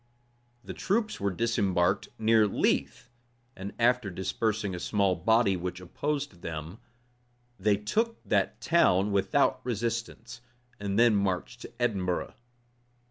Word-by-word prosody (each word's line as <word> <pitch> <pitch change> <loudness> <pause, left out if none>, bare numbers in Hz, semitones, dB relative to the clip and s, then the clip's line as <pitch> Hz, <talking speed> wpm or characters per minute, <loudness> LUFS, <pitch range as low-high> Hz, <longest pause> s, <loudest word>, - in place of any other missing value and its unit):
The - - -7
troops 215 +2 -1
were 100 - 0
disembarked 95 -4 +1
near 110 -1 +4
Leith; 100 - -1 0.4
and 95 +2 -6
after 120 -2 +2
dispersing 100 +3 -2
a 90 - -4
small 100 0 +1
body 105 +3 +3
which 90 0 -4
opposed 140 - -4
them, 80 +4 -6 0.8
they 100 +1 +2
took 225 - -1
that - - 0
town 105 - +3
without 100 +6 +2
resistance, 115 0 -4 0.4
and 100 0 -2
then 115 -2 +5
marched 95 -3 -1
to - - -10
Edinburgh. 95 -7 -1
105 Hz, 120 wpm, -28 LUFS, 95-115 Hz, 0.8 s, then